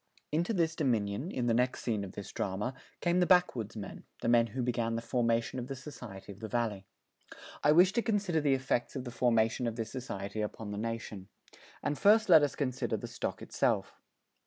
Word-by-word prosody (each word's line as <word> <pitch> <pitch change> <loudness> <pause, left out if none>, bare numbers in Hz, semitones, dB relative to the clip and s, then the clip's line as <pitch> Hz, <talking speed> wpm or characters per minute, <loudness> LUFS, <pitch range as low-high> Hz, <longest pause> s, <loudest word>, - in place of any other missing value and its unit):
Into 170 +7 +1
this 165 -6 +1
dominion, 120 - 0
in 125 -9 -2
the 120 - +3
next 125 +2 +1
scene 110 -4 -1
of 95 - -7
this 100 - -7
drama, 105 +6 -2 0.3
came 175 +1 +2
the 180 - +3
backwoodsmen, 115 - +1 0.2
the - - 0
men 120 0 +5
who 125 +4 -3
began 115 -2 0
the 115 - -2
formation 115 +1 0
of 125 - -5
the 135 - -4
society 125 -8 -9
of 100 - -12
the 110 - -5
Valley. 105 -4 -2 0.8
I 150 - +6
wish 180 +5 +6
to 235 - +2
consider 205 -8 +1
the 140 -2 +3
effects 130 -1 -1
of 130 - -3
the 125 - -6
formation 120 0 +2
of 115 - -2
this 115 -1 -4
society 105 -5 -4
upon 105 0 -4
the 100 - -4
nation. 110 -4 -4 0.6
And 145 - -1
first 215 +1 +5
let 160 -3 +9
us 145 -2 0
consider 130 -3 -1
the - - -6
stock - - -4
itself. - - -1
120 Hz, 200 wpm, -31 LUFS, 110-150 Hz, 0.8 s, let